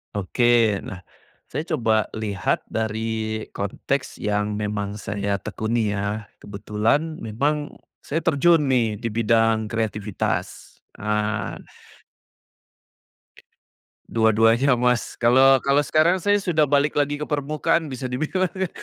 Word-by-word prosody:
Oke. 115 +1 +2
Nah, 95 -1 -9 0.5
saya 150 - -2
coba 110 -5 +1
lihat 105 -4 -1
dari 110 0 -2
konteks 130 +7 -3
yang 105 0 -1
memang 105 -1 -3
saya 100 -1 -2
tekuni 110 +2 -2
ya, 105 +2 -2 0.2
kebetulan 110 - -1
memang 145 +7 -2 0.2
saya 160 +3 -3
terjun 165 0 +4
nih 115 -4 +2
di 115 +2 -4
bidang 115 0 +2
kreativitas, 105 -2 -3 0.2
ah 105 -1 -2 2.5
Dua-duanya 115 +4 +3
Mas, 125 0 0
kalau 130 +3 +5
kalau 140 +1 +4
sekarang 165 +5 +2
saya 205 +3 +3
sudah 160 -7 +1
balik 145 +1 +2
lagi 145 0 0
ke 150 - -4
permukaan, 150 +2 0
bisa 130 -1 -6
dibilang 155 +8 -1
ya, 190 -1 -2
115 Hz, 110 wpm, -23 LUFS, 105-145 Hz, 2.5 s, kalau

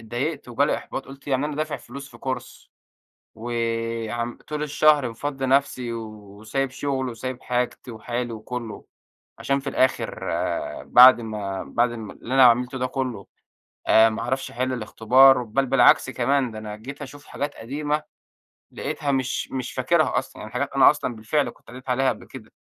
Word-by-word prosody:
اتضايقت 125 +6 -4
وجا 130 +4 +2
لي - - +1
إحباط. 135 - -6
قُلت 135 +1 -13
يعني 135 +1 +1
أنا 150 -1 -5
دافع 155 0 -2
فلوس 135 +2 -10
في - - -15
course، 130 -1 -6 0.7
وعم 115 0 -3
طول 150 0 -3
الشهر 150 -3 +3
مفضّي 135 +3 -4
نَفسي، 130 -3 +1
وسايب 110 +3 -5
شغلي، 135 -2 -2
وسايب 130 +2 -6
حاجتي 125 0 -2
وحالي 120 +2 -4
وكلّه، 115 +1 -7 0.5
عشان 140 0 0
في 135 - -4
الآخر 130 - 0 0.6
بعد 125 0 +8
ما 105 -4 -4
بعد 120 - +1
ال 110 -3 -7
اللي 125 - -7
أنا 135 -1 +7
عَملته 125 +2 +4
ده 130 - -1
كلّه، 125 -7 -4 0.6
آآ، 110 0 +6
ما 110 - -4
أعرفش 130 +2 -2
أحل 130 +2 -2
الاختبار. 125 +3 +5
بل 130 +4 0
بالعكس 125 0 +5
كمان، 130 0 +1
ده 110 - -8
أنا 105 -1 -7
جيت 140 +7 -9
أشوف 145 +1 -10
حاجات 145 +1 -4
قديمة 150 +5 -2 0.7
لقيتها 150 0 -3
مش 130 -1 -1
مش 130 -2 -4
فاكرها 155 +5 +2
أصلًا. - - -6
يعني - - -9
حاجات - - -2
أنا - - +8
أصلًا 120 - -3
بالفعل 135 +7 0
كنت - - -24
قريت 125 +2 -9
عليها 130 +1 +2
قبل - - -3
كده. - - -12
125 Hz, 165 wpm, -24 LUFS, 115-135 Hz, 0.7 s, بعد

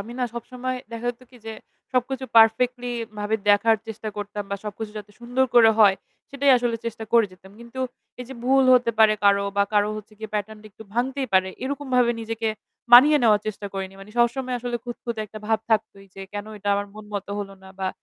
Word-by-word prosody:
আমি 225 +4 -8
না 250 - +1
সবসময় 255 +2 -5 0.2
দেখা 230 +1 -5
যেত 245 - -16
কি 250 - -16
যে 220 - -4 0.4
সবকিছু 260 +1 -1
পারফেক্টলি 245 +2 +4 0.3
ভাবে 210 +1 -1
দেখার 220 +2 +5
চেষ্টা 220 0 -6
করতাম 205 0 -5
বা 200 - -1
সবকিছু 210 +1 -6
যাতে 205 0 -11
সুন্দর 245 +2 +1
করে 225 -2 +8
হয় 200 -3 +7 0.4
সেটাই 280 0 +2
আসলে 240 -1 -1
চেষ্টা 225 -1 -5
করে 230 -2 +5
যেতাম। 190 +2 -17
কিন্তু 235 +2 -8 0.4
এই - - -5
যে 265 - -8
ভুল 270 +1 +4
হতে 245 -2 +3
পারে 220 -1 +6
কারো 200 0 +4
বা 200 - +4
কারো 210 0 +3
হচ্ছে 215 0 -10
গিয়ে 220 -1 -7
প্যাটার্ন 215 +1 -3
টা - - -13
একটু 215 - -13
ভাঙতেই 265 +3 -1
পারে। 190 0 +4 0.2
এরকম 280 +2 -4
ভাবে 245 -1 +4
নিজেকে 225 0 -3 0.4
মানিয়ে 290 +5 +9
নেওয়ার 215 -3 +4
চেষ্টা 210 -1 -4
করিনি। 195 0 -5
মানে 195 +2 -12
সবসময় 250 +2 +1
আসলে 240 0 -3
খুঁতখুঁতে 235 -2 -5
একটা 215 +1 -10
ভাব 220 0 +2
থাকতই 200 -2 -1
যে 195 - -8
কেন 205 0 -5
এটা 205 0 -4
আমার 200 0 -2
মন 215 0 -10
মতো 200 0 -4
হলো 195 -1 -6
না? 190 - -13
বা 190 -1 -1
225 Hz, 210 wpm, -24 LUFS, 205-245 Hz, 0.4 s, মানিয়ে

